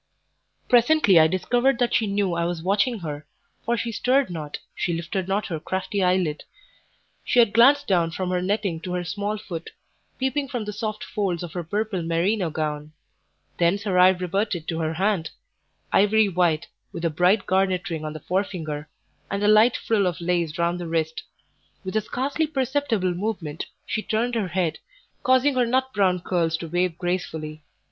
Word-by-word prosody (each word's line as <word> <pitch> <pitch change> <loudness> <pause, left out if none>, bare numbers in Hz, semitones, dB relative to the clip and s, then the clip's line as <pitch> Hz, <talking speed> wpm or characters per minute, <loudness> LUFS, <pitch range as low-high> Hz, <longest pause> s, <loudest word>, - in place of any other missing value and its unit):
Presently 240 - +5
I 160 - +6
discovered 240 +9 +1
that 245 -1 +1
she 220 - +2
knew 200 -2 0
I 170 0 0
was 170 -1 -3
watching 205 +4 +1
her, 150 -2 -6 0.4
for 235 +1 0
she 230 +2 -2
stirred 255 +1 +1
not, 155 -3 -5 0.2
she 175 - -2
lifted 170 +3 -3
not 200 +2 0
her 165 -3 -4
crafty 190 +4 -2
eyelid; 180 -4 +1 0.8
she - - -1
had 230 -3 +5
glanced 275 +5 +6
down 175 -4 +2
from 180 +2 -3
her 180 -1 0
netting 195 -3 -1
to 180 +2 -5
her 180 0 -1
small 205 +4 -3
foot, 170 -5 -7 0.5
peeping 265 +2 -1
from 245 -5 -4
the 210 - -4
soft 215 0 -4
folds 185 -5 -2
of 170 - -7
her 175 - -3
purple 205 +2 -2
merino 170 +3 0
gown; 150 -1 -4 0.7
thence 175 +4 +2
her 190 -4 +1
eye 180 +1 +8
reverted 185 -1 -1
to 165 -1 -2
her 160 0 -1
hand, 190 -3 0 0.6
ivory 210 +2 +4
white, 175 -3 +1 0.3
with 170 - -5
a 165 - +1
bright 180 +6 +3
garnet 185 -1 +1
ring 160 -2 -3
on 155 0 -4
the 155 - -7
forefinger, 160 -6 -3 0.4
and 200 +1 -2
a - - +3
light 215 +3 +5
frill 205 -4 +1
of 175 - -2
lace 170 -3 -1
round 170 +1 0
the 175 - -5
wrist; 160 -1 -1 0.6
with 190 +2 -5
a 215 - +3
scarcely 275 +8 -1
perceptible 265 - 0
movement 175 -5 -4 0.2
she 215 - -2
turned 230 +3 -1
her 220 -5 0
head, 175 -3 -1 0.4
causing 260 +2 +3
her 250 -2 +2
nut 260 +2 0
brown 190 -3 +2
curls 170 -2 0
to 165 - -6
wave 175 0 0
gracefully. 160 -4 -3
185 Hz, 180 wpm, -24 LUFS, 170-215 Hz, 0.8 s, eye